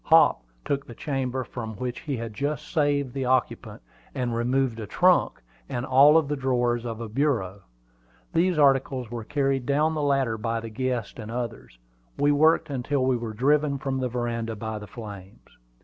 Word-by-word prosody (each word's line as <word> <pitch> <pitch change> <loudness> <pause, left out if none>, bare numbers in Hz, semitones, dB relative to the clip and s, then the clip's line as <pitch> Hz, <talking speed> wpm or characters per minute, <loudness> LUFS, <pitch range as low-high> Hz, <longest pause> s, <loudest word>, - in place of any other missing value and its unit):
Hop - - +5 0.2
took 140 -1 -2
the 120 - -10
chamber 130 -2 -2
from 115 -2 -7
which 125 +2 -4
he 145 -5 -4
had 115 -1 -5
just 145 +6 -3
saved 145 -5 +1
the 135 -1 -2
occupant, 130 - -1 0.3
and 125 -2 -1
removed 125 0 0
a 110 - -5
trunk 180 - +2 0.3
and 130 -2 -3
all 140 +5 +7
the 150 +1 -2
drawers 120 -3 0
of 115 -1 -4
a 115 - -5
bureau. 110 -6 -1 0.7
These 175 0 +2
articles 135 -4 +2
were 120 -2 -4
carried 135 -1 -1
down 150 +3 +2
the 155 - -2
ladder 135 -6 +1
by 115 +1 -1
the 115 0 -7
guests 125 -1 -3
and 110 -1 -7
others. 115 - -5 0.4
We 145 0 +3
worked 155 +1 +3
until 135 +1 -1
we 130 -1 +2
were 115 -2 -4
driven 140 +4 +2
from 135 -1 -2
the 130 -1 -1
veranda 115 -2 -3
by 110 0 -5
the 105 - -9
flames. 100 -3 -10
130 Hz, 180 wpm, -26 LUFS, 115-140 Hz, 0.7 s, all